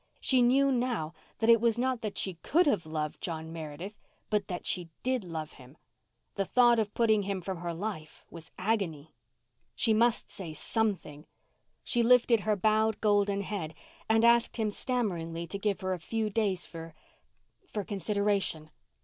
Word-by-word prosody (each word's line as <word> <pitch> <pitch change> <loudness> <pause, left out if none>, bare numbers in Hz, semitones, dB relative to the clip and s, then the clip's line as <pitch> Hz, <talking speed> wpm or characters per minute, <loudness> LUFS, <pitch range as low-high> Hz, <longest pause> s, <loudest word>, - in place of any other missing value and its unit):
She 260 -2 +3
knew 270 +3 +4
now 240 -11 -1 0.2
that 225 - +1
it 230 -1 +6
was 230 -1 +2
not 255 -1 0
that 215 -2 -4
she 190 - 0
could 345 +4 +3
have 205 - +1
loved 155 -1 -3
John 160 -3 -4
Meredith, 165 +6 -7 0.3
but 210 -2 +1
that 175 -1 -5
she 175 -2 -2
did 255 -3 0
love 160 -3 -5
him. 130 +4 -16 0.6
The 195 - 0
thought 240 +3 +4
of 210 -2 -2
putting 220 -3 +3
him 200 -1 -2
from 185 0 -5
her 175 0 -3
life 170 -3 -6
was 165 -1 -11
agony. 185 -7 -2 0.6
She 225 - +3
must 230 +1 +2
say 170 -5 -6
something; 180 -5 -2 0.6
she 240 - +1
lifted 235 -1 +5
her 210 +1 +1
bowed 215 +2 +2
golden 205 -1 +2
head 185 -6 -4 0.3
and 225 +1 +4
asked 235 0 +4
him 215 -2 0
stammeringly 175 -10 -2
to 185 +4 -5
give 205 -1 -1
her 185 0 -1
a 180 - -4
few 220 +5 -2
days 195 -4 0
for—for 165 - -10
consideration. 200 -4 -1
205 Hz, 165 wpm, -30 LUFS, 170-225 Hz, 0.6 s, it